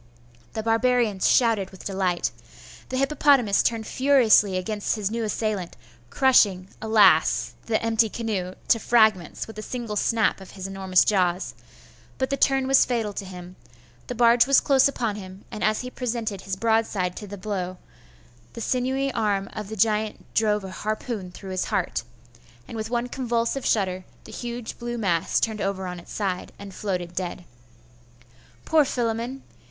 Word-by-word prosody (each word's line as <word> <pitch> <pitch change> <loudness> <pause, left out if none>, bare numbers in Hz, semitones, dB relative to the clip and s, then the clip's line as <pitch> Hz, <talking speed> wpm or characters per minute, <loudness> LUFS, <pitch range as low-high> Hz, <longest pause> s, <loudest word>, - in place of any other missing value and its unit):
The 220 - -3
barbarians 225 -3 +2
shouted 225 -6 +3
with 190 - -14
delight. 190 -3 0 0.6
The 255 - -2
hippopotamus 275 -6 +3
turned 225 -2 -1
furiously 240 -9 +4
against 205 +4 -2
his 210 -2 -2
new 230 0 -2
assailant, 210 -4 -2 0.3
crushing, 200 - +3
alas! 220 -1 +4
the 220 -1 +1
empty 225 -1 +2
canoe 200 -5 -3
to 230 - +5
fragments 215 -8 +2
with 220 -1 -10
a - - -4
single 230 -2 -5
snap 220 -1 +1
of 190 +1 -12
his 190 - -6
enormous 190 -1 +2
jaws; 185 -3 +1 0.6
but 260 +1 -1
the - - +2
turn 270 -1 +2
was 270 0 +6
fatal 225 -4 -1
to 200 - -5
him; 180 -1 -10 0.5
the 250 - -4
barge 235 +1 +5
was 275 -1 +6
close 275 -2 +4
upon 230 -6 -2
him, 190 -1 -10
and 215 - -5
as 215 0 +2
he 250 0 -7
presented 230 -6 -3
his 195 -1 -4
broad 225 +2 +2
side 180 -3 -2
to 210 - -7
the 205 +1 -8
blow, 185 -2 -4 0.8
the - - -8
sinewy 260 +3 0
arm 205 -4 -1
of 210 -2 -6
the 220 - -6
giant 215 +1 0
drove 210 -2 +2
a 190 - -7
harpoon 215 -1 -4
through 190 +1 -9
his 185 - -1
heart, 180 - -1 0.7
and - - -8
with 220 0 -4
one 240 0 -1
convulsive 240 0 -1
shudder 185 -3 0 0.2
the - - -12
huge 240 -1 -6
blue 240 0 -4
mass 175 -7 +1
turned 220 -2 -1
over 195 -1 -2
on 180 -1 -5
its 170 - -14
side 190 -3 -3
and 200 -1 -10
floated 180 -4 -3
dead. 180 -1 -4 1.2
Poor 315 -1 +4
Philammon! 240 0 -2
215 Hz, 165 wpm, -25 LUFS, 190-235 Hz, 1.2 s, was